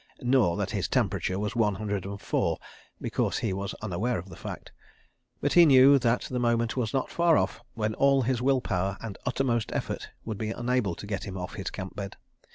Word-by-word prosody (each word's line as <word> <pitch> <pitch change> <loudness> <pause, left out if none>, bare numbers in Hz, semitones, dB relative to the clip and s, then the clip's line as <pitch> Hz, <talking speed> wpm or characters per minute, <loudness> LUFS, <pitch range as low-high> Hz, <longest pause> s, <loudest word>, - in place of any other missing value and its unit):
(Nor 120 -9 +3
that - - -2
his - - -1
temperature 95 - 0
was 105 +3 -2
one 105 -4 +2
hundred 100 -2 -3
and 100 0 -5
four—because - - -2
he 105 -5 -1
was 100 +1 -4
unaware 110 +5 -1
of 90 +2 -7
the - - -10
fact.) - - -8 0.7
But - - +1
he 175 - +8
knew 140 -2 +7
that 120 -1 +2
the 125 - -3
moment 115 -1 +1
was 120 -4 -1
not 135 - -1
far 170 -2 +4
off - - -1
when 110 -1 -1
all 135 +2 +3
his 125 0 0
will 130 0 +3
power 95 -2 -1
and 110 -4 -6
uttermost 125 -3 0
effort - - -3 0.2
would 110 -3 -4
be 110 - -2
unable 120 -5 0
to - - -8
get 100 -2 -3
him 95 -1 -6
off 90 -1 -5
his 95 - -4
camp 95 -2 -7
bed. 100 -1 -6
110 Hz, 205 wpm, -28 LUFS, 100-125 Hz, 0.7 s, he